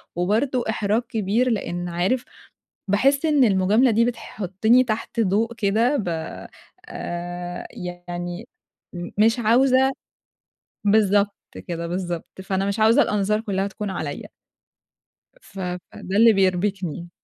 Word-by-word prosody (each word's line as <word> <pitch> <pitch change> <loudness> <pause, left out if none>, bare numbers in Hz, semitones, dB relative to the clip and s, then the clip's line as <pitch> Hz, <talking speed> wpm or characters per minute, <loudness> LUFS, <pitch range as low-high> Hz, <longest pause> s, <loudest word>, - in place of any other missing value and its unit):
وبرضه 225 +9 +1
إحراج 215 +1 +1
كبير، 225 +2 +1
لأن 175 -6 -2
عارف، 185 +9 0 0.7
باحس 275 +9 +3
إن 295 -4 +4
المجاملة 210 +4 +3
دي 230 +1 +3
بتحطِّني 220 0 +1
تحت 230 0 -3
ضوء 220 +3 +1
كده 225 +6 +1
ب 210 -9 -2 0.8
آآ 175 0 -5
يعني، 175 +3 -6 0.5
م 175 0 -6
مش 225 +3 +4
عاوزة 260 +3 +4 0.9
بالضبط 205 -1 +3 0.3
كده، 170 -1 -4
بالضبط. 175 -1 -4 0.2
فأنا 190 0 -1
مش 200 +2 -2
عاوزة 225 +6 +5
الأنظار 210 -2 +1
كلها 195 -3 -1
تكون 205 +1 -5
عليَّ. 155 -6 -5 1.1
ف 195 - -12
فده 180 +1 -5
اللي 230 +1 +7
بيربِكني. 185 -3 0
200 Hz, 115 wpm, -23 LUFS, 180-230 Hz, 1.1 s, اللي